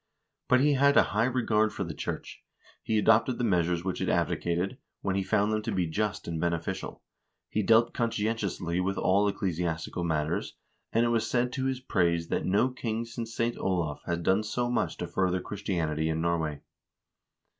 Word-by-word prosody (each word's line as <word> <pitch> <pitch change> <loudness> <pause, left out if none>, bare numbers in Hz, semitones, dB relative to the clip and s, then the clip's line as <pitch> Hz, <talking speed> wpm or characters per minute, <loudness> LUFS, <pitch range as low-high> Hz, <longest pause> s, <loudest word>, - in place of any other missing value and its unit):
But 125 0 +4
he 145 +1 +4
had 140 +1 +4
a - - +8
high 110 +2 +3
regard 115 -4 +2
for - - -3
the 85 -3 -5
church. - - -6 0.4
He 110 - 0
adopted 115 +4 +4
the 125 - -2
measures 90 -5 +1
which 95 -1 -3
it - - 0
advocated, 90 +9 0 0.2
when 95 -1 -1
he 100 - +1
found 105 +2 +1
them 110 - 0
to 110 +1 -3
be 95 -3 +1
just 105 +6 -2
and 80 -1 -3
beneficial; 85 -1 -3 0.5
he 110 - 0
dealt 115 +3 +4
conscientiously 105 -6 -1
with 95 +1 -1
all 100 +2 +3
ecclesiastical 85 -4 -2
matters, 75 -2 -1 0.4
and 115 +1 +3
it - - +2
was 115 -1 +1
said 125 0 +1
to 130 0 -2
his 130 -1 -1
praise 85 -8 +1
that - - -1
no 100 +7 +3
king 115 -2 -3
since 115 0 -6
St. 115 0 0
Olav 85 -6 -1
had 85 0 -1
done 95 +5 +3
so 120 +3 -2
much 125 - 0
to - - -3
further 95 -1 0
Christianity 85 -6 -2
in 80 0 -1
Norway. 80 -3 -1
100 Hz, 185 wpm, -29 LUFS, 85-115 Hz, 0.5 s, a